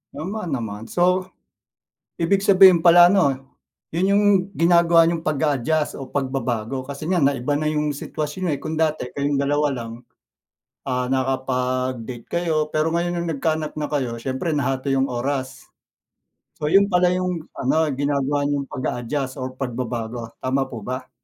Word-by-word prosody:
Tama 215 +3 -5
naman 115 - -5
so 180 +1 +2 1.0
ibig 195 +4 +1
sabihin 190 -3 +7
pala 175 0 +8
'no 180 -5 +4 0.6
yun 175 +3 +1
yung 205 +1 +3 0.3
ginagawa 170 -1 +5
niyong 165 -1 -1
pag-a-adjust 150 0 0
o 135 -1 -8
pagbabago 130 -2 -2
kasi 140 +3 -7
nga 175 -2 +1
naiba 140 0 +1
na 150 +1 0
yung 150 -1 -1
sitwasyon 155 +5 -4
eh 145 - -1
kung 155 - -5
dati 155 -4 0
kayong 140 0 0
dalawa 145 +1 +1
lang 120 -4 -5 1.0
ah 125 -1 -1
nakapag-date 130 -2 -2
kayo 160 -3 0
pero 155 +2 0
ngayon 175 0 -1
yung 170 - -3
nagkaanak 155 0 -2
na 150 - -2
kayo, 130 -5 -1
siyempre 130 +5 -2
nahati 135 -1 0
yung 135 - +2
oras. 130 +2 -3 0.9
So 150 - 0
yun 195 +4 +6
pala 180 0 +4
yung 180 -3 -2
ano 155 +4 +1
ginagawa 140 +1 0
niyong 140 -1 -2
pag-a-adjust 130 +2 -3
or 130 - -3
pagbabago. 120 -2 -4
Tama 135 +1 -1
po 110 -5 -8
ba? 130 +1 -5
145 Hz, 145 wpm, -22 LUFS, 130-165 Hz, 1.0 s, pala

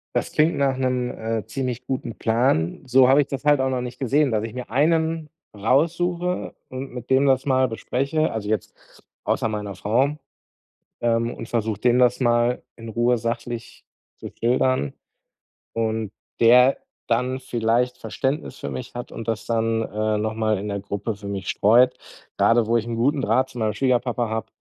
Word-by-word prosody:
Das - - -1
klingt 155 +2 +3
nach 135 -2 +1
'nem, 125 -1 0
äh, 110 -1 -3
ziemlich 125 +1 -4
guten 130 -3 -4
Plan. 110 -8 +1
So 130 0 +5
habe 135 +2 +6
ich 145 - +2
das 135 -1 -5
halt 145 -1 +4
auch 130 - +1
noch 130 -1 -1
nicht 125 0 -7
gesehen, 140 +2 +2
dass 110 0 0
ich 115 - -7
mir 125 0 -6
einen 160 +3 +1 0.2
raussuche 170 - 0
und 130 +1 -7
mit 125 -1 -8
dem 135 +1 +4
das 135 -1 +3
mal 130 -2 +3
bespreche, 140 +7 -1
also, 110 -2 -4
jetzt 110 0 -2 0.5
außer 110 - 0
meiner 105 -2 -4
Frau, 125 +10 +1 0.8
ähm, 115 0 +1
und 115 - -8
versuche 110 -3 -1
dem 120 0 +4
das 125 -1 +3
mal 120 0 +2
in 115 -1 -9
Ruhe 120 +2 +2
sachlich 115 0 -5 0.3
zu - - -8
schildern 125 - +1 0.8
und 110 -1 -1 0.3
der 125 +3 +6 0.3
dann 125 +3 0
vielleicht 120 +1 0
Verständnis 135 +6 -3
für - - -5
mich 125 - -6
hat 120 - -6
und 115 - -7
das 110 -3 -2
dann, 115 -1 0
äh, 110 0 -1
noch 110 +1 -2
mal 110 -1 +1
in 105 +2 -5
der 100 0 -2
Gruppe 100 +2 -4
für 100 -1 -9
mich 100 -1 -4
streut. 120 +5 +4 0.4
Grade 115 0 +4
wo 115 +2 +2
ich 115 0 -3
'n 120 - -3
guten 140 +6 +1
Draht 130 0 +2
zu 130 - -12
meinem 110 -1 0
Schwiegerpapa 125 0 0
habe 110 0 -3
120 Hz, 180 wpm, -23 LUFS, 110-130 Hz, 0.8 s, habe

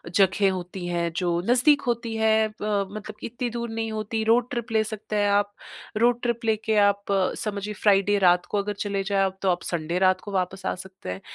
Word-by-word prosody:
जगह 195 0 +4
होती 180 0 -6
हैं 170 -1 -1
जो 180 0 0 0.2
नजदीक 285 +4 +5
होती 230 -1 -1
है 220 0 +3
अ, - - -12 0.4
मतलब 215 0 -7
इत्ती 245 +1 -3
दूर 235 0 -4
नहीं 225 0 -3
होती, 220 +1 -2
रोड 235 +2 +3
ट्रिप 235 -1 -4
ले 220 -1 +3
सकते 215 0 -6
हैं 205 -1 +2
आप। 205 0 +1 0.4
रोड 240 +1 +3
ट्रिप 235 -1 -1
लेके 220 0 +1
आप 200 0 +1 0.3
समझिए 210 0 -3
फ्राइडे 205 0 +4
रात 180 -1 +4
को 205 - -3
अगर 205 +1 -2
चले 200 -1 -2
जाए 195 0 +1
आप 190 0 -4
तो 190 - +1
आप 175 -1 +1
संडे 170 +1 -2
रात 185 0 +3
को 205 - -8
वापस 190 0 -2
आ - - 0
सकते 185 - -10
हैं। 90 +1 -5
205 Hz, 210 wpm, -25 LUFS, 190-225 Hz, 0.4 s, नजदीक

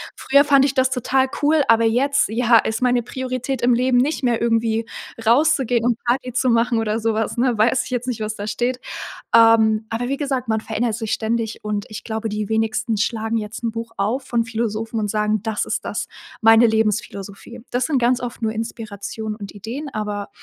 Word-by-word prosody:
früher 280 +1 +4
fand 275 -2 +5
ich 275 - 0
das 260 -1 +3
total 260 +1 +1 0.2
cool, 300 0 +4
aber 230 0 +5
jetzt, 265 +4 +2
ja, 230 0 +4
ist 220 +3 -2
meine 245 -1 +2
Priorität 255 +1 -4
im 245 0 +4
Leben 250 +1 +2
nicht 280 +3 +1
mehr, 240 -2 +2
irgendwie, 230 -1 +1 0.4
rauszugehen 250 -1 +3
und 240 -2 +2
Party 250 +1 0
zu 255 0 +1
machen 230 +1 +2
oder 220 0 -1
so 225 0 0
was,“ 225 +2 -2
ne? 240 -2 +1
Weiß 235 +3 +3
ich - - -8
jetzt 250 0 -2
nicht, 240 -3 -2
was 215 0 -3
da 205 - -6
steht. 245 +3 -1 0.6
Ähm, 225 -1 +5
aber 240 +2 -2
wie 275 - -1
gesagt, 265 -4 -2
man 220 0 +1
verändert 225 0 -1
sich 220 -2 -4
ständig 225 0 -1
und 210 -1 -2
ich 210 0 -7
glaube, 220 0 -3
die 210 -1 -3
wenigsten 220 0 0
schlagen 225 +1 -1
jetzt 215 +2 -6
'n 230 - -1
Buch 230 0 -6
auf 235 +7 -1
von 235 -1 0
Philosophen 225 0 -3
und 210 - -1
sagen: 210 -1 0
„Das 220 -1 -1
ist - - -3
das - - -3 0.4
meine 225 +1 +7
Lebensphilosophie.“ 215 0 -2
Das 245 +1 0
sind 290 -5 +1
ganz 245 +1 +2
oft 245 -1 -6
nur 220 -1 0
Inspirationen 220 -1 -5
und 200 -3 -8
Ideen, 230 +9 -6
aber 210 -1 -4
230 Hz, 205 wpm, -21 LUFS, 220-250 Hz, 0.6 s, meine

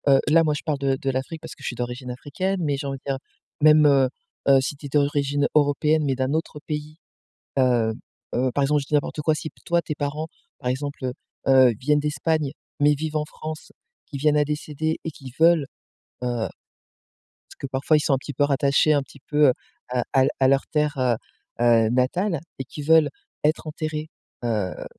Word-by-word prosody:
heu, - - +5
là 165 +1 +6
moi 150 -1 +1
je - - -4
parle 150 -3 -1
de 135 -1 +1
de 135 - -2
l'Afrique 135 +5 -4
parce 160 - -8
que - - -19
je - - -4
suis 120 - -3
d'origine 125 +1 -5
africaine, 180 +9 -3
mais 145 -2 +1
j'ai 140 0 -4
envie 135 - -3
de - - -56
dire, 135 - -1 0.4
même 155 0 +7
heu, 135 -3 +5 0.4
heu, 135 -1 +6
si 135 - -3
tu 145 0 -8
es - - -11
d'origine 145 0 +1
européenne, 150 +1 +3
mais 135 -2 +1
d'un 130 +2 -1
autre 160 -1 -2
pays. 150 0 -5 0.6
Heu, 120 -4 +3 0.4
heu, 130 +1 +1
par 140 - +2
exemple, 145 +1 +2
je - - -9
dis 150 - -4
n'importe 150 +1 0
quoi, 155 +1 +3
si 155 - -5 0.2
toi 170 0 +2
tes 155 - -4
parents, 150 +2 -3 0.3
par 125 - -4
exemple, 140 +1 -3
heu, 125 - -2 0.4
heu, 130 -2 +7
viennent 150 +3 +2
d'Espagne, 150 0 0 0.3
mais 145 +1 +5
vivent 155 +1 -3
en 150 - +1
France, 155 +1 -8 0.3
qu'ils 140 - -6
viennent 150 0 +3
à 150 - +4
décéder 150 +1 -2
et 160 - -2
qu'ils 135 -4 -11
veulent, 165 -2 +5 0.6
heu, - - 0 1.2
parce - - -17
que - - -4
parfois 135 +4 +2
ils - - +3
sont 145 - +2
un 135 - +1
petit 145 - -7
peu 145 - +1
rattachés, 140 +2 +3
un 145 -2 +3
petit 135 0 -16
peu, 150 -1 +5
heu, - - +5 0.4
à 125 -1 -1
à 135 - +6
l - - +2
à 130 - +5
leur 135 0 +3
terre, 150 -1 +1
heu, 125 -2 +2 0.5
heu, 115 -2 +5
natale 155 +8 +1 0.2
et 135 - -3
qui 145 +3 -8
veulent 160 -1 +5 0.3
être 155 +1 +1
enterrés, 155 0 -4 0.4
heu 105 -6 -2
145 Hz, 215 wpm, -24 LUFS, 135-155 Hz, 1.2 s, même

